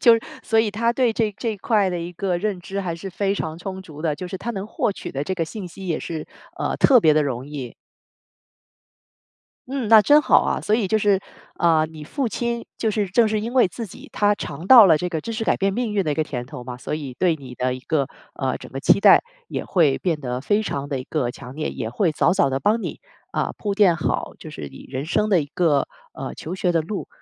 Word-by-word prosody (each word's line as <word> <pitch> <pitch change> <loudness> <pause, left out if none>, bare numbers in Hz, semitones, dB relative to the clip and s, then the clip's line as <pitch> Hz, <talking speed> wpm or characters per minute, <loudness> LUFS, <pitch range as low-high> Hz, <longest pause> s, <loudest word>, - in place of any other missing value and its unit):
就 235 - +7 0.3
所 225 - +1
以 220 -2 +3
他 230 +3 +1
对 240 -2 +2
这 220 -2 0
这 230 - -1
一 - - -7
块 205 -1 +2
的 180 -1 -2
一 170 +1 -6
个 180 0 -1
认 195 -1 -2
知 195 +2 -4
还 175 -4 -3
是 170 +4 -7
非 195 +2 -1
常 160 -4 -4
充 190 +2 -6
足 155 -5 -11
的， 160 -3 +1
就 180 - -6
是 185 +1 -5
他 235 - -4
能 200 -3 -4
获 215 - -1
取 195 - -7
的 140 +1 -2
这 190 +5 -2
个 170 - -1
信 190 +4 -7
息 190 +2 -10
也 165 - 0
是， 160 -2 -5 0.3
呃， - - -1
特 260 -3 +6
别 155 -5 +5
的 155 - +4
容 130 -1 -3
易。 140 -5 -6 2.0
嗯， 260 -4 -2
那 220 -1 +8
真 295 +6 +6
好 - - +5
啊。 - - -1
所 215 - +1
以 220 -4 0
就 220 +3 +2
是， 205 -2 +3 0.4
呃， 160 -2 +3
你 155 -1 -10
父 265 - -2
亲， 235 +1 -3
就 220 - 0
是 205 -2 -1
正 225 +5 +4
是 215 0 0
因 230 +4 -5
为 255 - +6
自 220 +5 -6
己 - - -13
他 205 0 +3
尝 155 -3 -7
到 235 -1 +10
了 160 -3 +5
这 180 - -2
个 160 -3 -3
知 230 - -5
识 225 - -3
改 - - +2
变 195 0 +1
命 235 0 -2
运 200 -2 +1
的 155 - 0
一 - - -2
个 155 - +1
甜 125 -5 -5
头 135 -3 -8
嘛， 125 0 -6
所 125 - -4
以 140 -4 -6
对 175 -3 +3
你 130 -3 -10
的 125 +1 -1
一 130 - -8
个， 140 +1 0 0.3
呃， 130 -2 -2
整 - - -11
个 135 - -5
期 200 - +4
待 - - +7 0.3
也 - - -4
会 155 -7 +3
变 165 -5 -1
得 125 -1 -3
非 205 +7 +2
常 140 -8 -3
得 135 - -1
一 - - -8
个 135 -4 -1
强 125 +1 -10
烈， 155 +1 -3
也 - - -4
会 160 - +1
早 175 - +3
早 140 -8 +3
地 135 +1 -1
帮 220 +8 +2
你， - - -5 0.3
啊， - - -1
铺 205 -2 -2
垫 195 -5 +4
好 155 - -2
就 155 - -9
是 75 - -7
你 - - -12
人 135 +3 -4
生 210 +5 +1
的 185 -4 +5
一 145 - -4
个， 155 -1 +1 0.2
呃， - - -6
求 165 - -6
学 185 -1 0
的 165 -2 +2
路。 195 +5 -5
180 Hz, 280 characters per minute, -22 LUFS, 150-210 Hz, 2.0 s, 到